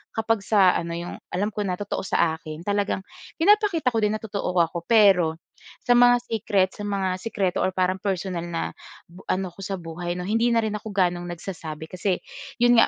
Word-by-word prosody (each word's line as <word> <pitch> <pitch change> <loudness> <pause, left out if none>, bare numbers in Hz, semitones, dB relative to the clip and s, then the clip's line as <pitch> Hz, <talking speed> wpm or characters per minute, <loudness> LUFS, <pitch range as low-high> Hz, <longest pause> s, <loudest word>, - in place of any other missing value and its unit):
kapag 225 0 +1
sa 195 -2 +4
ano 170 0 -3
‘yong, 170 +1 -6 0.2
alam 205 +4 0
ko 210 - -6
na 180 - 0
totoo 205 +2 -4
sa 160 -1 +1
akin, 155 0 -8
talagang 200 -1 -1 0.3
pinapakita 390 - +3
ko 225 - 0
din 210 0 +1
na 215 - -7
totoo 200 -4 -3
ako. 170 +1 -3
Pero 195 -8 +5 0.5
sa - - +1
mga 245 0 +6
secret, 205 -5 +1
sa 205 -1 -6
mga 190 -2 -1
sikreto 195 -4 -1
or 185 - 0
parang 185 0 +1
personal 185 -3 -2
na 170 -1 -3 0.4
bu 180 +2 -14
ano 185 -1 -1
ko 175 - -21
sa 195 0 -3
buhay, 175 0 -5
‘no, 180 - -4
hindi 225 +5 +1
na 230 - +3
rin 220 - -1
ako 220 - -10
gaanong 175 -2 +1
nagsasabi. 160 -3 -7
Kasi 185 +1 0 0.5
‘yon 240 -1 +6
nga, - - +6
190 Hz, 200 wpm, -24 LUFS, 175-215 Hz, 0.5 s, mga